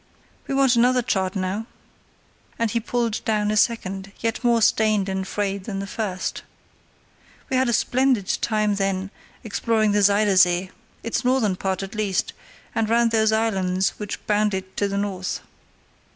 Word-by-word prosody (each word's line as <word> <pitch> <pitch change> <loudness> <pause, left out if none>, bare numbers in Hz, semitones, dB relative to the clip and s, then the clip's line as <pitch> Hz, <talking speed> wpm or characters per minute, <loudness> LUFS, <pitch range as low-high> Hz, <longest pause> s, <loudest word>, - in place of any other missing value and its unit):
"We 275 - -2
want 270 -2 +4
another 250 +1 +3
chart 190 -3 -1
now," 195 +4 -2 0.9
and 230 -2 0
he 235 - +1
pulled 235 -1 -2
down 210 -2 0
a - - 0
second 195 -3 0
yet 225 +2 -2
more 235 -1 +4
stained 215 -3 +3
and 190 0 -3
frayed 200 -2 -2
than 200 -3 -4
the 195 - -3
first. 195 -3 -3 1.1
"We 260 - +2
had 260 -1 +2
a - - +1
splendid 250 -4 +2
time 215 -2 +1
then 195 0 -1 0.3
exploring 220 0 +1
the 205 0 +2
Zuyder 200 0 +3
Zee, 180 0 +4 0.3
its 230 +2 -2
northern 250 -6 +2
part 190 +1 -2
at 195 +3 -7
least, 210 -3 -1 0.4
and 220 -1 0
round 230 0 +3
those 220 -1 +3
islands 190 -4 +1
which 210 -1 -6
bound 210 -1 +1
it 190 +1 -6
on 200 - +2
the 200 - -2
north. 195 -2 -3
210 Hz, 165 wpm, -23 LUFS, 195-230 Hz, 1.1 s, want